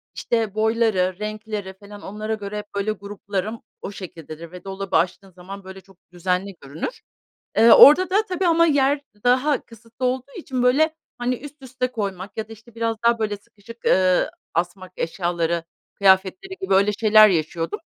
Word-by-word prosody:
işte, 225 -4 -1
boyları, 215 -4 +1
renkleri 215 -2 -5
falan 205 +1 -13
onlara 215 +2 -4
göre 210 -1 -5
hep 205 -1 -9
böyle 200 +2 0
gruplarım, 205 +1 -5 0.2
o - - -6
şekildedir 165 -4 -9
ve 180 -1 -11
dolabı 195 -2 -2
açtığın 185 +3 -1
zaman 190 +3 -10
böyle 190 0 -10
çok 195 -1 -22
düzenli 180 +2 -2
görünür. 145 - -6 0.6
Eee, 225 +1 +7
orada 325 +9 +9
da 410 +4 +2
tabii 365 0 0
ama 335 0 +5
yer 285 -2 +2 0.2
daha 260 +4 +2
kısıtlı 230 +2 -8
olduğu 255 +2 -2
için, 260 -8 -3
böyle, 310 +6 +3 0.2
hani, 245 +1 -1
üst 290 +3 -12
üste 255 -1 -3
koymak 200 -4 -5
ya 220 -1 -3
da, - - -8
işte, 225 +1 -18
biraz 230 0 -1
daha, 235 0 +4
böyle, 210 -2 -1
sıkışık, 215 +3 -16
ııı, 185 -1 +3 0.2
asmak 180 +2 -3
eşyaları, 170 -1 -1 0.3
kıyafetleri 200 - +2
gibi, 380 - 0
öyle 200 +2 +4
şeyler 215 0 +6
yaşıyordum. 165 -1 -2
210 Hz, 165 wpm, -22 LUFS, 190-245 Hz, 0.6 s, orada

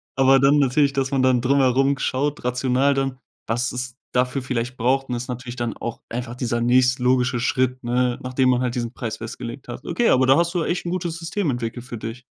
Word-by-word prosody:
Aber 135 0 +5
dann 140 +2 +4
natürlich, 140 +1 +3
dass 135 0 -1
man 135 -1 +1
dann 130 -2 +3
drumherum 135 +1 +3
schaut 145 +3 -1
rational 130 +2 +2
dann, 135 -1 -1 0.3
was 120 +4 -1
es 125 -1 -4 0.2
dafür 125 +2 +1
vielleicht 125 0 -3
braucht 130 +3 +1
und 125 - -1
ist 120 +1 -5
natürlich 125 0 -6
dann 120 -1 -2
auch 120 - -5
einfach 120 0 -5
dieser 120 -1 -2
nächstlogische 125 0 +3
Schritt, 130 0 0
ne, 125 0 +1
nachdem 130 0 +1
man 125 0 +2
halt 125 -1 -1
diesen 120 -1 -3
Preis 115 -4 -5
festgelegt 115 +3 -7
hat. 125 +2 -7
Okay, 240 - +1
aber 130 0 +4
da 135 +1 +5
hast 170 +1 +1
du 180 - 0
ja - - -1
echt 175 0 -2
'n - - -2
gutes 175 -2 -3
System 165 +1 -2
entwickelt 120 -1 -3
für 120 -2 -7
dich. 115 +3 -7
125 Hz, 220 wpm, -22 LUFS, 120-135 Hz, 0.3 s, Aber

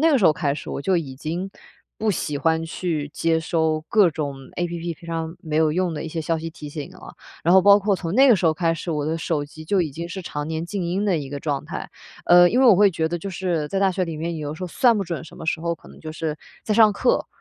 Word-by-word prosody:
那 325 +1 +5
个 280 - +4
时 205 - +1
候 155 - +7
开 145 -3 -1
始， 150 - -7
我 - - -4
就 190 +3 +2
已 145 -6 -3
经 170 +7 -4 0.5
不 220 0 +1
喜 150 -5 -2
欢 160 +2 +1
去 160 -3 -3
接 165 +1 +1
收 160 -1 0
各 205 -6 +5
种 145 -3 -3 0.2
App 170 -1 -3
平 170 - -14
常 165 0 -4
没 155 -2 -3
有 155 -1 +3
用 180 0 0
的 150 - -4
一 - - -5
些 160 +1 -4
消 165 +1 0
息 165 +1 -5
提 150 -2 -9
醒 145 -1 -7
了， - - -13 0.3
然 170 +3 +5
后 190 - +7
包 200 +1 +7
括 200 0 +1
从 170 -2 -4
那 270 +3 +6
个 245 - +8
时 180 - -3
候 160 - +5
开 165 0 0
始， 165 +1 -5
我 155 +1 -1
手 160 -2 -1
机 155 +2 -12
就 195 +4 +1
已 165 -4 -1
经 170 +4 -5
是 190 +2 -6
常 150 -4 -5
年 160 +1 -3
静 195 0 -3
音 185 +4 -1
的 190 -4 +2
一 140 -3 -5
个 145 - -4
状 140 -2 -2
态。 - - -6 0.4
呃， 175 0 +7
因 245 - +1
为 265 - +6
我 225 - +8
会 200 +1 +5
觉 160 -2 -1
得 175 - -2
就 195 +4 -6
是 175 -4 -2
在 195 - -1
大 195 -1 +4
学 185 0 0
里 165 -2 -5
面 165 +1 -3
有 150 -2 -4
的 - - -5
时 185 - -9
候 - - -2
算 230 +5 +3
不 200 - -1
准 170 -2 -5
什 - - -13
么 160 - -8
时 160 - 0
候 170 0 -1
可 - - -20
能 - - -14
就 155 - -7
是 155 -1 -3 0.3
在 215 - 0
上 215 -1 +6
课， 245 +5 +1
165 Hz, 320 characters per minute, -23 LUFS, 155-185 Hz, 0.5 s, 个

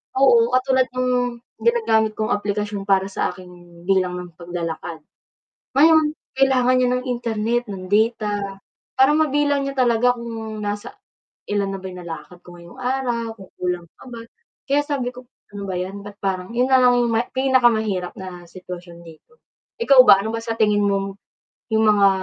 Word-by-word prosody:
oo 245 -3 +4
katulad 260 0 +2
ng 255 0 0 0.5
ginagamit 225 - +2
kong 215 - 0
aplikasyon 205 0 -2
para 195 -1 +2
sa - - -1
aking 175 -2 -15
bilang 185 -2 +2
ng 180 -1 -9
paglalakad. 170 -1 -5 0.8
Ngayon 310 +1 +5 0.2
kailangan 260 -2 +3
niya 250 - +3
ng 250 - -4
Internet, 235 -1 -1
ng 190 -2 -6
data, 210 -2 0 0.4
para 265 +2 +5
mabilang 290 -2 +2
niya 275 - -6
talaga 245 -1 +3
kung 225 -2 -6
nasa 205 - -5 0.5
ilan 205 -1 0
na - - -4
ba - - -17
'yong 180 - -10
nalakad 175 +1 -9
ko 175 - -12
ngayong 170 +8 -14
araw, 245 -3 -2
kung 195 -3 -14
kulang 180 -1 -2
pa - - -14
ba. 235 -2 -8 0.4
Kaya 280 +1 +2
sabi 275 -5 -2
ko, 250 0 -13 0.3
ano 205 0 -7
ba 190 - -3
'yan, 190 +3 -4
ba't 205 -1 -10
parang 190 +2 -3
'yon 250 +2 +2
na 260 - +6
lang 250 -1 +5
'yong 235 - 0 0.2
pinakamahirap 230 -8 +2
na 180 -2 -9
sitwasyon 175 -1 -10
dito. 165 - -16 0.5
Ikaw 275 - +5
ba 195 - +8
ano 220 - -3
ba 230 - -3
sa 230 0 -4
tingin 210 -2 +2
mong 195 0 -1 0.6
'yong 220 0 +3
mga 205 -2 +5
220 Hz, 165 wpm, -21 LUFS, 190-255 Hz, 0.8 s, ba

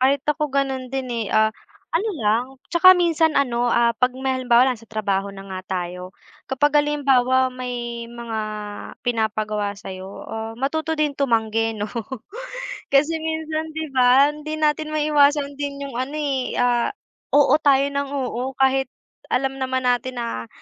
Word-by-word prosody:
kahit 270 +2 +2
ako 300 0 0
ganon 270 -2 -1
din, 260 -1 -3
eh, 230 -3 -2
ah 220 0 +3 0.4
ano 400 +7 +1
lang, 220 +3 +2 0.3
tsaka 370 +2 +8
minsan 330 -3 +2
ano, 245 -3 +1
ah, 235 0 +3
pag 250 +2 +1
may 265 0 -1
halimbawa 250 -1 +4
lang 250 -4 -1
sa 230 - -18
trabaho 200 -2 -1
na 195 0 -9
nga 190 -1 -5 0.2
tayo, 180 +1 -7 0.4
kapag 290 +2 +3
halimbawa 260 -3 +2
may 240 -2 -5
mga 235 -2 -5 0.7
pinapagawa 215 -3 -1
sa'yo, 190 0 -8
ah, 225 0 -5
matuto 315 +4 -1
din 300 -2 +1
tumanggi, 225 -4 0
'no, 205 - -2 1.0
kasi 285 +4 +3
minsan, 315 0 -3
'di 315 -3 -4
ba. 260 +3 +5
Hindi 305 +1 -6
natin 305 0 +1
maiwasan 290 -2 +3
din 280 -1 -3
yung 275 - -7
ano, 275 +4 -3
eh, 275 -4 -1
ah 245 -1 +2 0.5
oo 290 -1 +6
tayo 275 -2 +4
ng 280 0 -1
oo, 265 -1 -3
kahit 265 -1 +2 0.4
alam 270 +1 0
naman 260 0 -1
natin 250 +1 0
na, 175 - -4
260 Hz, 155 wpm, -22 LUFS, 235-290 Hz, 1.0 s, tsaka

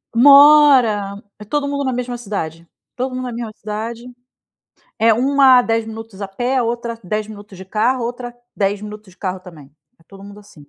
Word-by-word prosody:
Mora, 265 -7 +5 0.2
é 210 - -10
todo 285 +5 -2
mundo 280 0 -2
na 260 -1 -1
mesma 245 0 -4
cidade, 170 -7 -6 0.3
todo 255 0 -3
mundo 255 - -4
na 245 - -5
mesma 230 -2 -6
cidade. 225 +3 -6 0.9
É 225 +1 +4
uma 265 +2 +4
a - - +4
10 225 -1 -1
minutos 225 -2 -9
a 195 - -4
pé, 245 +6 -2
a 250 - +1
outra 235 0 -4
10 210 +3 -3
minutos 205 -3 -12
de 190 - -9
carro, 230 +6 0
a 230 - -1
outra 245 0 -7 0.2
10 200 0 -1
minutos 210 -2 -10
de - - -24
carro 185 -1 -4
também. 155 -7 -15 0.2
É - - -25
todo 195 0 -14
mundo 205 +1 -12
assim. 200 -8 -18
225 Hz, 200 wpm, -18 LUFS, 200-250 Hz, 0.9 s, Mora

